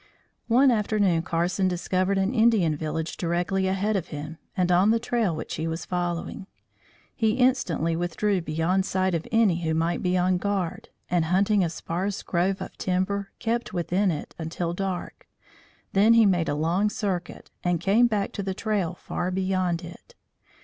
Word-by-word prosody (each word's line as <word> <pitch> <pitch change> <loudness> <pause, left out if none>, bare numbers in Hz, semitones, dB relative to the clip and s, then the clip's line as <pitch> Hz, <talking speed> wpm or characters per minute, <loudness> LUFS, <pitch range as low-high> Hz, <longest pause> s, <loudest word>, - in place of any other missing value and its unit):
One 255 +3 +5
afternoon 205 -6 +2
Carson 175 +3 0
discovered 185 +2 0
an 195 +5 +1
Indian 220 -9 +3
village 160 +1 -4
directly 180 +2 0
ahead 195 +3 0
of 190 - -1
him 150 +2 -7 0.2
and 180 -1 +2
on 180 +4 +4
the 225 - +4
trail 230 -7 0
which 155 - -6
he 160 +1 -2
was 165 +1 -4
following. 175 +1 -3 0.7
He 220 -2 +2
instantly 225 - +1
withdrew 175 +3 0
beyond 165 +4 0
sight 185 0 0
of 165 -1 -2
any 215 -7 +3
who 160 -1 0
might 165 +2 0
be 180 0 +1
on 180 0 +2
guard, 195 -3 -2 0.2
and, 175 -2 +1
hunting 195 +4 +3
a 170 - 0
sparse 180 +4 -3
grove 185 +2 0
of - - -10
timber, 190 +2 -1
kept 235 -1 -2
within 185 +3 +1
it 155 -4 -4
until 170 +1 -3
dark; 190 -1 -4 0.7
then 215 +4 +5
he 230 -1 +6
made 175 -4 +2
a - - 0
long 170 +7 +1
circuit, 190 -5 -4
and 175 -1 +1
came 205 +7 +4
back 210 -3 -1
to 200 - -4
the 190 -1 -3
trail 200 -6 -1
far 175 0 -3
beyond 185 -2 0
it. 175 - -12
185 Hz, 170 wpm, -26 LUFS, 170-200 Hz, 0.7 s, he